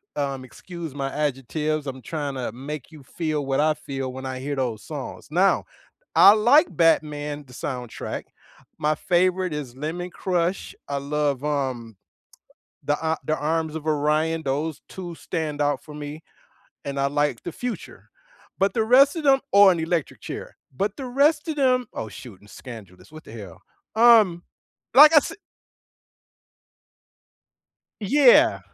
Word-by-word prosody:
Um, 135 -2 -3
excuse 170 +4 -9
my 135 -1 -3
adjectives, 150 +1 -2
I'm 130 -1 -6
tryna 140 -2 -4
make 140 +3 -7
you 155 -3 -13
feel 155 +1 -3
what 135 0 0
I 155 +1 +3
feel 135 -3 -6
when 130 0 -7
I 130 -1 -4
hear 140 +2 -3
those 120 -5 -3
songs. 145 -4 -7
Now, 185 +4 +2 0.5
I 200 - +9
like 250 +10 +5
Batman, 150 -3 +1
the 125 - -16
soundtrack. 125 -2 -5 0.5
My 155 0 +1
favorite 180 +1 +1
is 140 -5 -6
Lemon 170 +6 -5
Crush. 180 0 -2
I 140 - -2
love, 145 -1 -1
um, 130 -7 -3 0.9
The 145 - +1
A 160 0 0
The 155 - +1
Arms 160 +1 -1
of 160 -1 -6
Orion, 155 +2 +1
those 145 +3 -2
2 175 -3 -7
stand 155 -3 -4
out 145 -2 0
for 150 - -12
me, 150 +1 -7 0.6
and 140 0 -4
I 140 - +2
like 145 -3 -1
The 175 - -6
Future, 245 -2 -7 0.5
but 195 +1 +1
the 225 - +2
rest 275 +6 +5
of 325 - -3
them 270 -1 +5
Oh, 200 0 +8
and 175 -3 +3
Electric 165 -1 -2
Chair, - - -8 0.2
but 200 +8 -2
the 265 - -6
rest 290 +5 +2
of 310 - -2
them 255 -3 +2
oh, 110 - -5
shoot, 115 -3 -12
and 105 - -19
Scandalous, 110 - -12
what 155 - -12
the - - -13
hell? 100 -7 -10 0.3
Um, 220 -7 +6 0.5
like 300 +4 +9
I - - +7
s 295 - +4 2.7
Yeah. 290 - +5
150 Hz, 155 wpm, -24 LUFS, 135-180 Hz, 2.7 s, I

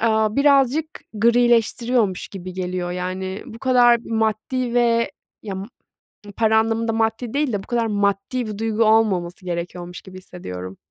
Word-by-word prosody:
aaa, 220 0 +2
birazcık 280 +1 +4 0.3
grileştiriyormuş 235 -2 +2
gibi 185 -2 -8
geliyor. 180 -1 -3
Yani, 185 +2 -4
bu 230 -3 -10
kadar 245 -2 +5
maddi 225 +3 -1
ve 235 -1 +2 0.3
ya 200 -3 -5
m 190 - -5 0.7
para 220 -1 +3
anlamında 225 0 0
maddi 225 +1 -1
değil 285 -4 0
de 195 - -2
bu - - -17
kadar 235 -1 0
maddi 205 +4 0
bir 210 - -5
duygu 225 +1 +1
olmaması 200 -5 +2
gerekiyormuş 175 0 -5
gibi 185 -1 -12
hissediyorum. 95 - -8
220 Hz, 145 wpm, -21 LUFS, 185-235 Hz, 0.7 s, kadar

